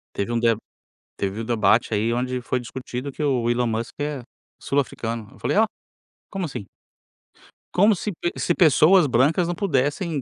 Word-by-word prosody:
Teve 100 Hz, +4 st, -2 dB
um 120 Hz, -, +1 dB
de 115 Hz, -1 st, +3 dB, 0.6 s
teve 100 Hz, +3 st, -2 dB
o -, -, -4 dB
debate 115 Hz, -1 st, +2 dB
aí 110 Hz, +3 st, +1 dB
onde 125 Hz, +1 st, -2 dB
foi 125 Hz, +1 st, -1 dB
discutido 125 Hz, +2 st, -6 dB
que 150 Hz, -, -8 dB
o 125 Hz, -5 st, +1 dB
Elon 120 Hz, 0 st, +1 dB
Musk 115 Hz, +1 st, -3 dB
é 145 Hz, -3 st, -3 dB, 0.4 s
sul-africano. 115 Hz, -5 st, -2 dB
Eu -, -, -18 dB
falei: -, -, 0 dB
"Olha, 220 Hz, 0 st, +5 dB, 0.6 s
como 195 Hz, -2 st, -3 dB
assim?". 125 Hz, -, -6 dB, 1.1 s
Como 205 Hz, +3 st, +5 dB
se 210 Hz, -, -3 dB
pe 175 Hz, -1 st, -3 dB
se 175 Hz, -, +1 dB
pessoas 165 Hz, +1 st, +5 dB
brancas 145 Hz, +8 st, +2 dB
não 175 Hz, -, -2 dB
pudessem, 155 Hz, -2 st, 0 dB
130 Hz, 170 wpm, -23 LUFS, 115-165 Hz, 1.1 s, Olha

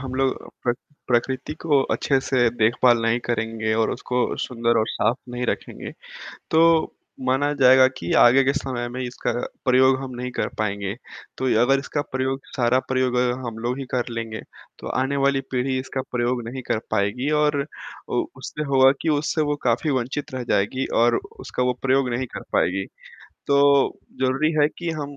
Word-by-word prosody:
हम 130 Hz, -1 st, -6 dB
लोग 135 Hz, 0 st, -1 dB, 0.2 s
प्र 120 Hz, -, +3 dB, 0.4 s
प्रकृति 130 Hz, +3 st, 0 dB
को 150 Hz, -4 st, +3 dB
अच्छे 135 Hz, -, +1 dB
से 125 Hz, -3 st, +2 dB
देखभाल 120 Hz, +2 st, +4 dB
नहीं 115 Hz, +1 st, +2 dB
करेंगे 115 Hz, -2 st, -1 dB
और 110 Hz, 0 st, +1 dB
उसको 125 Hz, 0 st, -1 dB
सुंदर 115 Hz, -2 st, 0 dB
और 110 Hz, -, +1 dB
साफ 120 Hz, -, 0 dB
नहीं 125 Hz, 0 st, -3 dB
रखेंगे, -, -, -4 dB, 0.6 s
तो 165 Hz, 0 st, +4 dB, 0.3 s
माना 140 Hz, +3 st, +2 dB
जाएगा 130 Hz, 0 st, +7 dB
कि 85 Hz, -, -5 dB
आगे 130 Hz, +3 st, +6 dB
के 140 Hz, +1 st, +2 dB
समय 130 Hz, -4 st, -3 dB
में 125 Hz, +2 st, -5 dB
इसका 125 Hz, -1 st, -3 dB, 0.3 s
प्रयोग 130 Hz, +1 st, +5 dB
हम 135 Hz, -1 st, -6 dB
नहीं 125 Hz, +1 st, -4 dB
कर -, -, -2 dB
पाएँगे। 100 Hz, -2 st, -2 dB, 0.4 s
तो 130 Hz, -, -2 dB, 0.2 s
अगर 135 Hz, +3 st, +4 dB
इसका 145 Hz, +1 st, -3 dB
प्रयोग 130 Hz, +1 st, -1 dB, 0.2 s
सारा 125 Hz, 0 st, +3 dB
प्रयोग 130 Hz, -1 st, +1 dB
अगर 125 Hz, 0 st, +2 dB, 0.2 s
हम 115 Hz, -1 st, -6 dB
लोग 120 Hz, +3 st, -2 dB
ही 135 Hz, -, -4 dB
कर 125 Hz, -1 st, -1 dB
लेंगे, 115 Hz, -2 st, -5 dB, 0.4 s
तो -, -, -7 dB
आने 130 Hz, +2 st, -1 dB
वाली 140 Hz, -1 st, +2 dB
पीढ़ी 130 Hz, +1 st, 0 dB
इसका 130 Hz, 0 st, -4 dB
प्रयोग 120 Hz, 0 st, 0 dB
नहीं 130 Hz, +2 st, -6 dB
कर 110 Hz, -, +1 dB
पाएगी 110 Hz, +7 st, 0 dB
और 145 Hz, -2 st, +1 dB, 0.4 s
उ -, -, +1 dB
उससे 150 Hz, -, -5 dB
होगा 135 Hz, -2 st, +5 dB
कि 160 Hz, -, 0 dB
उससे 155 Hz, +1 st, +1 dB
वो 145 Hz, -1 st, 0 dB
काफ़ी 125 Hz, +5 st, +1 dB
वंचित 130 Hz, +2 st, -3 dB
रह 130 Hz, -1 st, -3 dB
जाएगी 130 Hz, +7 st, +1 dB, 0.2 s
और 120 Hz, -, +4 dB, 0.2 s
उसका 125 Hz, -, -3 dB
वो 125 Hz, 0 st, +1 dB
प्रयोग 135 Hz, -1 st, +2 dB
नहीं 120 Hz, +2 st, -1 dB
कर -, -, -5 dB
पाएगी। 95 Hz, +2 st, +1 dB, 0.6 s
तो, 140 Hz, -1 st, +4 dB, 0.2 s
ज़रूरी 135 Hz, +5 st, +1 dB
है 145 Hz, -, +5 dB
कि 170 Hz, -1 st, -3 dB
हम 145 Hz, -1 st, -6 dB
130 Hz, 180 wpm, -23 LUFS, 120-135 Hz, 0.6 s, जाएगा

